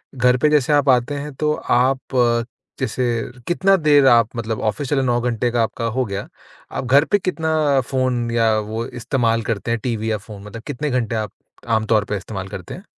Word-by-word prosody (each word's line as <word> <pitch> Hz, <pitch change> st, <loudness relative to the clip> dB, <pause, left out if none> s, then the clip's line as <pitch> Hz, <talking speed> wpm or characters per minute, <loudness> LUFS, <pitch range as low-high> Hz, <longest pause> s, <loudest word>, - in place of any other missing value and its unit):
घर 125 Hz, 0 st, +3 dB
पे 150 Hz, -, +4 dB
जैसे 150 Hz, -1 st, +2 dB
आप 145 Hz, -1 st, +3 dB
आते 125 Hz, +3 st, +3 dB
हैं 145 Hz, +1 st, -5 dB
तो 150 Hz, 0 st, +1 dB
आप 130 Hz, +1 st, +1 dB, 0.8 s
जैसे 125 Hz, +3 st, -1 dB, 0.4 s
कितना 195 Hz, +3 st, +3 dB
देर 150 Hz, -5 st, +4 dB
आप 115 Hz, -3 st, +5 dB
मतलब 110 Hz, -1 st, -3 dB
ऑफिस 135 Hz, +5 st, -4 dB
चले 140 Hz, -2 st, +2 dB
9 120 Hz, -1 st, +1 dB
घंटे 120 Hz, 0 st, 0 dB
का 120 Hz, 0 st, +1 dB
आपका 115 Hz, +1 st, -3 dB
हो 130 Hz, -1 st, +1 dB
गया, 100 Hz, -2 st, -5 dB, 0.4 s
आप -, -, -4 dB
घर 140 Hz, +4 st, +5 dB
पे 205 Hz, -, +2 dB
कितना 160 Hz, -6 st, +1 dB
फ़ोन 130 Hz, -3 st, 0 dB
या 115 Hz, -1 st, +3 dB
वो 110 Hz, +2 st, -4 dB
इस्तेमाल 120 Hz, -2 st, 0 dB
करते 115 Hz, +1 st, -3 dB
हैं 115 Hz, -, 0 dB
टीवी 110 Hz, -3 st, -2 dB
या 105 Hz, -, 0 dB
फ़ोन 105 Hz, -1 st, -11 dB
मतलब 105 Hz, +2 st, -9 dB
कितने 150 Hz, +4 st, -3 dB
घंटे 120 Hz, -3 st, -1 dB
आप 110 Hz, -1 st, -3 dB, 0.4 s
आम 110 Hz, -1 st, +1 dB
तौर 105 Hz, -2 st, +2 dB
पे 105 Hz, -, -1 dB
इस्तेमाल 95 Hz, 0 st, -6 dB
करते 95 Hz, -3 st, -8 dB
हैं? 185 Hz, -, -9 dB
120 Hz, 205 wpm, -20 LUFS, 110-140 Hz, 0.8 s, आप